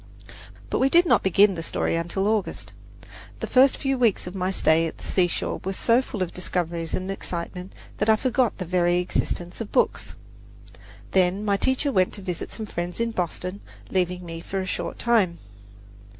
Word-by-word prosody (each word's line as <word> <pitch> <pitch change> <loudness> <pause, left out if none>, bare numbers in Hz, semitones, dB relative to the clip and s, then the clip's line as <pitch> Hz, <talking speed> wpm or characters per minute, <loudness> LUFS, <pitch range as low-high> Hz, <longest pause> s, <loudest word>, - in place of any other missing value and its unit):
But - - +1
we 265 - +4
did 345 +4 +5
not - - +4
begin 195 +2 +4
the 170 - -5
story 165 - -1
until 170 +4 -1
August; 215 -2 -2 0.7
the - - -2
first 265 +1 +5
few 270 -2 -1
weeks 230 -5 +2
of 180 - -6
my 185 -1 -1
stay 165 -3 +3
at - - -8
the - - -14
seashore 175 -2 0
were 190 - -2
so 235 +5 +3
full 220 -7 -3
of 175 - -6
discoveries 170 -2 -2
and 185 +1 -3
excitement 180 0 -5 0.3
that 210 - +1
I 220 - +7
forgot 250 0 +1
the 185 - -4
very 175 0 +2
existence 180 +1 -2
of 215 - -6
books. - - 0 1.0
Then 190 +2 +2
my 200 -1 +2
teacher 260 +7 +1
went 185 -6 +2
to 205 - -5
visit 180 -3 -4
some 220 - -5
friends 175 -2 -4
in 230 0 0
Boston, 180 0 -3 0.3
leaving 180 -1 0
me 165 -1 -7
for 195 +3 -4
a 190 - -2
short 175 -2 -4
time. 215 -8 +2
185 Hz, 185 wpm, -25 LUFS, 175-220 Hz, 1.0 s, I